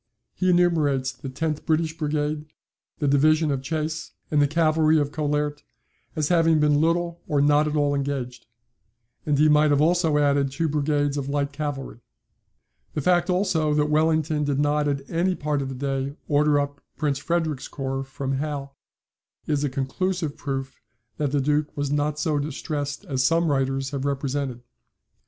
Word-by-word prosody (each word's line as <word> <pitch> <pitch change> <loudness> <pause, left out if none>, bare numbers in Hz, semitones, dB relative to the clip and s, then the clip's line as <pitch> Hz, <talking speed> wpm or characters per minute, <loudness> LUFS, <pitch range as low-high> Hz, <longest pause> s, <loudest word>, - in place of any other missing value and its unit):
He 185 - 0
enumerates 155 -7 +2
the 130 +1 -8
tenth 155 +3 -3
British 160 0 0
Brigade, 150 -1 -2 0.5
the 145 - -1
division 155 +2 +3
of 135 -2 -1
Chasse, 155 +2 -3 0.2
and 150 -1 +3
the 145 - +4
cavalry 155 0 +3
of 145 -1 0
Collaert, 150 -1 -1 0.5
as 155 -2 0
having 165 -2 +4
been 150 -1 +3
little 170 +1 0
or 145 - +1
not 145 +1 +4
at 150 - -2
all 145 -1 +2
engaged; 135 -3 -3 0.8
and 145 -1 +2
he 155 +2 +5
might 150 0 +5
have 145 -1 +3
also 165 -1 +3
added 140 -1 +2
two 165 +5 -1
brigades 145 -1 0
of 140 -1 -3
light 140 0 -1
cavalry." 145 -5 -5 1.0
The 150 - 0
fact, 175 +3 +2
also, 165 -5 +1
that 150 0 +1
Wellington 155 0 +2
did 145 -2 0
not 145 +1 +1
at 140 -1 -2
any 180 +3 0
part 150 -2 -1
of 135 - -3
the 135 - -5
day 135 +1 -2
order 145 0 +3
up 145 0 -3 0.2
Prince 145 -3 0
Frederick's 160 -3 -1
corps 135 -1 -3
from 135 0 -3
Hal, 140 -2 -4 0.7
is 145 -1 0
a 145 - +1
conclusive 155 +4 -2
proof 135 -1 -5 0.4
that 145 -3 -1
the 145 -1 +1
Duke 150 +2 0
was 145 -1 -1
not 145 0 0
so 150 -1 0
distressed 145 +2 -4
as 135 -7 -1
some 165 +2 +2
writers 135 0 0
have 140 -1 -3
represented. 140 -3 -2
145 Hz, 170 wpm, -24 LUFS, 140-155 Hz, 1.0 s, he